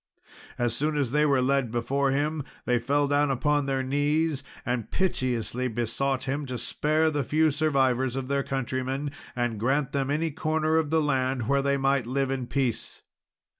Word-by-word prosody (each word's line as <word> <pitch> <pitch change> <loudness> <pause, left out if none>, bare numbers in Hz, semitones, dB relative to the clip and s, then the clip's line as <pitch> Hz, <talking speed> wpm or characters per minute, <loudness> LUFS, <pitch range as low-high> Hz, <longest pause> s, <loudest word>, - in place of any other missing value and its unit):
As 120 -1 0
soon 150 +2 0
as 135 -5 0
they 150 +2 +3
were 135 -3 +3
led 135 -2 +1
before 135 +4 0
him 145 +2 0 0.2
they 125 -1 +2
fell 140 +4 +1
down 145 +1 +2
upon 145 +2 +1
their 135 -1 0
knees, 145 +2 0 0.2
and 120 -2 -2
piteously 130 - -1
besought 125 +3 -1
him 140 +2 -2
to 125 -1 -3
spare 155 +5 +1
the 145 -2 0
few 155 +5 +2
survivors 130 -4 +1
of 135 -1 -3
their 140 0 +1
countrymen, 135 +1 -2 0.2
and 120 -3 -1
grant 135 +4 +1
them 135 -1 -1
any 155 +3 0
corner 155 +1 0
of 160 -2 +1
the 160 +1 +3
land 130 -4 0
where 140 +1 +3
they 140 0 +1
might 135 -3 +1
live 135 +1 0
in 130 -2 -2
peace. 125 -3 -2
135 Hz, 175 wpm, -27 LUFS, 130-145 Hz, 0.2 s, they